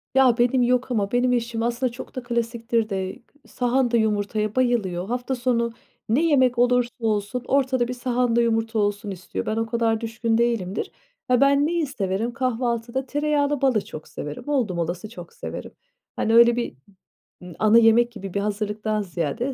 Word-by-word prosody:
Ya, 260 -3 +5
benim 250 +1 +3
yok 250 +1 +1
ama 205 -4 0
benim 250 +1 +2
eşim 235 -1 -1
aslında 240 +1 0
çok 240 - -10
da 255 - -4
klasiktir 235 -1 -1
de 190 -2 -3 0.3
sahanda 245 -1 +1
yumurtaya 215 0 0
bayılıyor. 210 -8 0
Hafta 245 +3 -2
sonu 235 -2 0 0.4
ne 255 +9 +3
yemek 260 -6 +3
olursa 245 0 +3
olsun 220 +2 -1
ortada 260 -3 +2
bir 250 - -3
sahanda 245 -1 +1
yumurta 225 -1 0
olsun 205 0 -1
istiyor. 185 0 -5
Ben 215 - -1
o 225 - 0
kadar 225 -1 0
düşkün 225 0 -1
değilimdir. 230 -5 -1 0.4
He, 250 0 +4
ben 280 +1 +4
neyi 335 0 0
severim 225 -2 -2
kahvaltıda 245 0 -1
tereyağıyla 290 0 0
balı 250 -7 +2
çok 155 - -9
severim. 145 0 -7
Oldum 240 -12 0
olası 175 +5 -3
çok 175 -6 -11
severim. - - -7 0.4
Hani, 225 - 0
öyle 235 0 +7
bir, 240 - -3 0.7
eee, 180 -1 -10
ana 215 +1 +5
yemek 235 +1 +5
gibi 195 -5 -8
bir 200 - 0
hazırlıktan 210 +1 -2
ziyade 190 - -3
235 Hz, 165 wpm, -23 LUFS, 215-250 Hz, 0.7 s, öyle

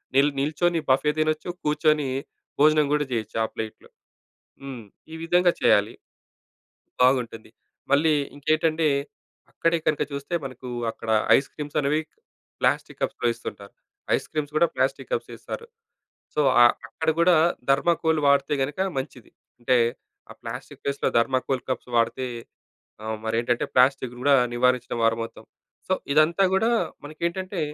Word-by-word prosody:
నిల్ 140 +2 +5
నిల్చొని 160 +4 +1
బఫే 135 +3 +3
తినొచ్చు, 155 +2 0
కూర్చొని 150 -1 +2 0.5
భోజనం 155 0 +5
కూడా 150 -1 +1
చేయొచ్చు 110 -2 -3
ఆ - - -3
ప్లేట్‌లో. 110 -1 -7 0.7
హ్మ్. 130 -4 -7 0.3
ఈ - - -5
విధంగా 175 +1 +3
చేయాలి. 105 +3 +3 1.1
బాగుంటుంది. 125 -4 +1 0.4
మళ్ళీ 155 +3 +4 0.2
ఇంకేంటంటే, 155 +2 +1 0.6
అక్కడే 165 0 +1
కనుక 155 - +2
చూస్తే 140 +5 -4
మనకు 130 -1 -8 0.2
అక్కడ 115 - -9 0.3
ఐస్ 135 - -2
క్రీమ్స్ 145 -1 -5
అనేవి 150 +2 +1 0.6
ప్లాస్టిక్ - - 0
కప్స్‌లో 120 - -1
ఇస్తుంటారు. 105 -3 -9 0.4
ఐస్ - - -5
క్రీమ్స్ 150 -1 -3
కూడా 170 - +5
ప్లాస్టిక్ - - -1
కప్సే 485 - -2
ఇస్తారు. 465 - -7 0.7
సో, - - +1 0.2
అ - - +9 0.2
అక్కడ 160 0 -1
కూడా 175 +1 +5 0.4
థర్మాకోల్ 160 +3 +2
వాడితే 140 +1 +3
గనుక 145 +7 -3 0.2
మంచిది. 130 -3 -7 0.3
అంటే 125 +1 +2 0.5
ఆ - - -7
ప్లాస్టిక్ - - -8
ప్లేస్‌లో 140 0 -1
థర్మాకోల్ 130 +2 0
కప్స్ 125 - -4
వాడితే 130 +2 0 0.8
ఆహ్, 110 0 -3
మరి 110 0 -1
ఏంటంటే 120 0 0
ప్లాస్టిక్‌ని 130 -1 +2
కూడా 140 +1 +5 0.2
నివారించిన 125 0 +1
వారవుతాం. 115 0 -1 0.4
సో, - - +1 0.2
ఇదంతా 155 +6 +4
కూడా 220 +4 +2 0.3
మనకేంటంటే 170 +5 -4
140 Hz, 130 wpm, -25 LUFS, 125-155 Hz, 1.1 s, అ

